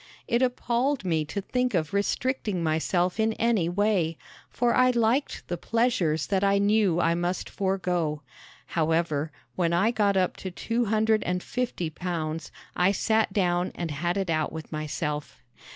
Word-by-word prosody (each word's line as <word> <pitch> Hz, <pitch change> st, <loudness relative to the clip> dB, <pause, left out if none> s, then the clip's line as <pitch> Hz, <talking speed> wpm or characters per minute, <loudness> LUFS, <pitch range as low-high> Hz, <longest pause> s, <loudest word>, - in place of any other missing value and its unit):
It 235 Hz, +1 st, +2 dB
appalled 250 Hz, 0 st, 0 dB
me 160 Hz, -3 st, +1 dB
to 200 Hz, +6 st, -4 dB
think 250 Hz, +2 st, -1 dB
of 155 Hz, -1 st, -1 dB
restricting 205 Hz, -2 st, 0 dB
myself 175 Hz, +4 st, 0 dB
in 220 Hz, 0 st, +2 dB
any 220 Hz, -8 st, +1 dB
way, 180 Hz, -4 st, +1 dB, 0.3 s
for 240 Hz, 0 st, +1 dB
I 255 Hz, 0 st, +5 dB
liked 240 Hz, +3 st, +1 dB
the 175 Hz, -, -3 dB
pleasures 225 Hz, -10 st, +1 dB
that 195 Hz, -1 st, 0 dB
I 200 Hz, 0 st, +4 dB
knew 200 Hz, -3 st, +3 dB
I 170 Hz, -1 st, +3 dB
must 175 Hz, +1 st, -2 dB
forego. 180 Hz, -6 st, -1 dB, 0.4 s
However, 160 Hz, -2 st, 0 dB, 0.2 s
when 170 Hz, -2 st, +1 dB
I 195 Hz, +7 st, +3 dB
got 205 Hz, -4 st, +2 dB
up 185 Hz, -1 st, +1 dB
to 190 Hz, -, -5 dB
two 230 Hz, +6 st, -1 dB
hundred 220 Hz, +1 st, +2 dB
and 180 Hz, 0 st, -2 dB
fifty 235 Hz, -10 st, -2 dB
pounds 165 Hz, -2 st, -4 dB, 0.2 s
I 180 Hz, +2 st, +3 dB
sat 220 Hz, +1 st, +1 dB
down 180 Hz, -2 st, +1 dB
and 170 Hz, -3 st, -3 dB
had 175 Hz, +5 st, -1 dB
it 190 Hz, -3 st, -1 dB
out 155 Hz, -1 st, 0 dB
with 160 Hz, 0 st, -8 dB
myself. 150 Hz, -1 st, -4 dB
185 Hz, 160 wpm, -27 LUFS, 165-220 Hz, 0.4 s, I